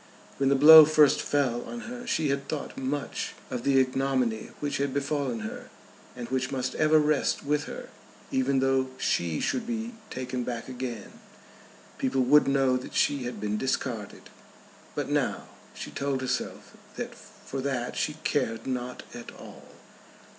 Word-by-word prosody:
When 135 -1 +2
the 140 - +4
blow 155 +3 +11
first 150 -1 +5
fell 130 -5 0
on 240 - -7
her 245 0 -8
she 155 -9 +1
had 140 0 -1
thought 150 -2 -4
much 135 +2 -3 0.2
of 125 -2 -2
the 135 +1 +3
ignominy 130 -4 0
which 145 -1 -2
had 140 -1 -1
befallen 140 -4 -1
her, 110 - -7 0.5
and 120 -1 -6
which 130 0 -1
must 130 -1 -2
ever 155 0 +4
rest 150 -2 +1
with 145 0 0
her. - - -8 0.4
Even 130 +1 +2
though 135 0 +2
she 85 -9 0
should 245 -2 -1
be 235 0 -3 0.2
taken 125 -1 -4
back 120 -1 -4
again, 125 -4 -6 0.8
people 130 0 +1
would 145 +4 +5
know 135 -2 +3
that 125 - -8
she 140 -3 +2
had 120 - -5
been 105 0 -2
discarded. 130 -5 -3 0.6
But - - -2
now - - 0 0.3
she - - -7
told 140 -1 -2
herself 130 -1 -4 0.2
that - - -5
for 135 - -8
that 130 -3 -2
she - - -1
cared 115 0 -1
not 125 -1 -4
at 120 - -8
all. - - -13
135 Hz, 160 wpm, -27 LUFS, 125-145 Hz, 0.8 s, blow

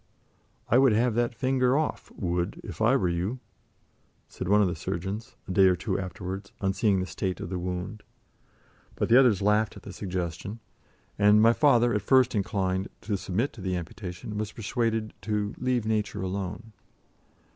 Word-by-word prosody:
"I 120 - +4
would 135 -4 +5
have 120 +2 +2
that 120 +1 0
finger 130 0 +2
off, 155 - -2
Wood, 90 0 -2
if - - -8
I 115 +5 +5
were 95 -9 +2
you," 90 +8 -1 0.9
said 90 - -6
one 105 +1 +5
of 100 - +4
the 90 - -1
surgeons, 95 +7 -4
a - - -4
day 95 +1 +6
or 90 - +4
two - - -2
afterwards, 95 +2 -6
on 95 -1 0
seeing 100 -1 +2
the 90 - -1
state 95 0 -3
of - - -5
the 90 - -2
wound. 90 +4 -4 0.9
But - - -1
the 120 +3 +8
others 115 -8 +4
laughed 105 0 +2
at - - -13
the 100 - -8
suggestion, 90 +2 -4 0.6
and 105 +1 +6
my 115 +2 +6
father, 120 -4 +4
at 105 - +1
first 130 +4 +4
inclined 95 -2 -1
to 105 - -2
submit 100 +7 -1
to 115 - -11
the 95 -1 -1
amputation, 90 +3 -6
was 105 -1 -3
persuaded 115 -1 -1
to 105 +1 -1
"leave 125 -3 0
Nature 105 -3 -1
alone." 95 +3 -4
105 Hz, 180 wpm, -27 LUFS, 95-115 Hz, 0.9 s, the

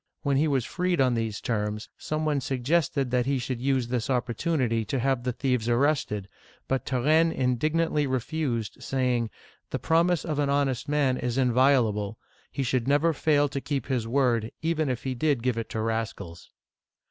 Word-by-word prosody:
When 140 -2 +2
he 155 +3 +3
was 135 -5 +1
freed 180 -1 -1
on 130 -2 +4
these 115 -2 -2
terms, 105 -2 -2
some 155 0 -3
one 145 -3 +1
suggested 135 +1 0
that 125 0 +1
he 140 -1 +1
should 125 -1 -4
use 130 -2 +1
this 125 0 -2
opportunity 125 -1 0
to 110 +6 -2
have 135 0 +1
the 125 +1 -1
thieves 125 -2 -1
arrested; 120 -6 +1 0.4
but 135 -1 -1
Turenne 155 +6 +3
indignantly 150 +4 +1
re 130 0 +1
fused, 120 -5 -3
saying: 125 -3 0 0.2
" - - -32
The - - -2
promise 170 +1 +2
of 155 -3 -2
an 145 -1 +1
honest 140 -1 0
man 140 -3 +2
is 125 0 -2
invio 130 -2 +4
lable. 105 +1 -4 0.4
He 140 - -2
should 125 -1 0
never 145 +4 +3
fail 145 0 +2
to 140 0 -4
keep 140 -4 -2
his 125 -4 -1
word, 120 -3 +1
even 160 -3 0
if 125 -1 -3
he 130 - -2
did 140 -2 0
give 125 -2 +1
it 115 - -5
to 110 - -3
rascals 110 -7 -4
130 Hz, 185 wpm, -27 LUFS, 120-145 Hz, 0.4 s, on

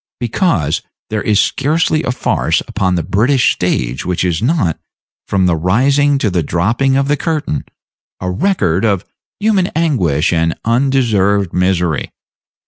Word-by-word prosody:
Because 115 - 0 0.3
there 110 -1 -1
is 105 -1 +2
scarcely 155 +2 +1
a 160 - -3
farce 125 - 0
upon 95 -2 0
the 85 - -1
British 120 +5 +2
stage 65 -8 -2
which 90 0 -1
is 85 -3 0
not, 120 - 0 0.5
from 95 -2 +1
the 90 -2 +2
rising 135 - +2
to 110 -7 0
the 90 -1 +1
dropping 115 - +1
of 135 0 +1
the 145 - +2
curtain, 150 - -2 0.5
a 90 0 -3
record 95 - 0
of 100 -4 +1 0.3
human 205 -3 +2
anguish 95 - +1
and 80 0 +1
undeserved 115 -7 +1
misery. 90 -4 0
105 Hz, 140 wpm, -15 LUFS, 90-140 Hz, 0.5 s, is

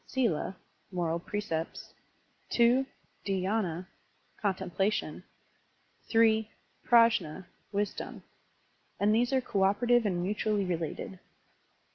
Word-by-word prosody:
^tla 210 -8 0 0.4
(moral 170 -2 -1
precepts), 170 -4 -4 0.6
2, 240 +2 +5 0.4
Dhydna 190 -2 -1 0.6
(con 200 -3 +1
templation), 190 +3 -1 0.9
3, 220 -1 +4 0.4
Prajnd 225 -7 +4 0.3
(wisdom); 205 -1 -3 0.8
and 205 +1 +3
these 240 +3 +2
are 265 -1 +3
cooperative 215 +3 +2
and 175 -3 -1
mutually 205 +1 0
related. 175 +1 -4
205 Hz, 85 wpm, -30 LUFS, 180-225 Hz, 0.9 s, 2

